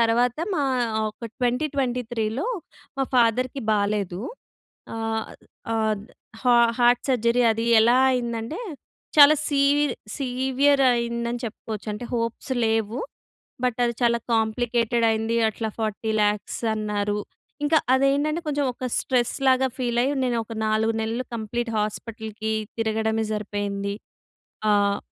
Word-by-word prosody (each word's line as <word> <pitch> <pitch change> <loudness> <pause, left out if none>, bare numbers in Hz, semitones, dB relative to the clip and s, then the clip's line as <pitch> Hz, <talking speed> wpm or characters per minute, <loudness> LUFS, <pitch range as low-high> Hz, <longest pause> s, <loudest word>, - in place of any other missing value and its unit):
తర్వాత 235 +3 +2 0.2
మా 295 - +1 0.5
ఒక 230 +2 -8
2023లో 250 - -1 0.5
మా - - +2
ఫాదర్‌కి 250 +3 +2
బాలేదు. 200 -3 0 0.7
ఆహ్, 225 0 -3 0.4
ఆహ్, 220 -1 +1 0.5
హ - - -20 0.3
హార్ట్ 245 0 +4
సర్జరీ 245 -1 +2
అది 225 +1 -2 0.2
ఎలా 240 +3 +5
అయిందంటే, 235 - -3 0.6
చాలా 295 +1 +9
సీ 280 -2 +1 0.6
సీవియర్ 265 +1 +2
అయిందని 235 0 -2
చెప్పుకోవచ్చు. 220 -1 -6
అంటే 210 +4 -6
హోప్స్ 230 +3 -2
లేవు. 220 +1 0 0.7
బట్ 245 -3 0
అది 235 - 0
చాలా 235 -1 +3 0.2
కాంప్లికేటెడ్ 230 +1 +1
అయింది. 225 +1 0
అట్లా 220 +1 -4
4000000 215 -1 -1 0.2
అన్నారు. 210 -1 -1 0.5
ఇంకా 315 +2 +4 0.2
అదే 270 +1 +4
ఏంటంటే 305 +3 -1
కొంచెం 290 -1 0
ఒక 255 +1 -4
స్ట్రెస్‌లాగా 260 +1 +2
ఫీల్ 240 -2 0
అయ్యి, 280 +3 0
నేను 240 -2 0
ఒక 225 - -8
4 220 +1 +2
నెలలు 225 +3 -2
కంప్లీట్ 230 +2 -3
హాస్పిటల్‌కి 220 0 -4 0.3
తిరగడమే 220 0 0
సరిపోయింది. 200 -1 -3 0.8
ఆహ్, 200 -1 +3
230 Hz, 115 wpm, -24 LUFS, 220-250 Hz, 0.8 s, చాలా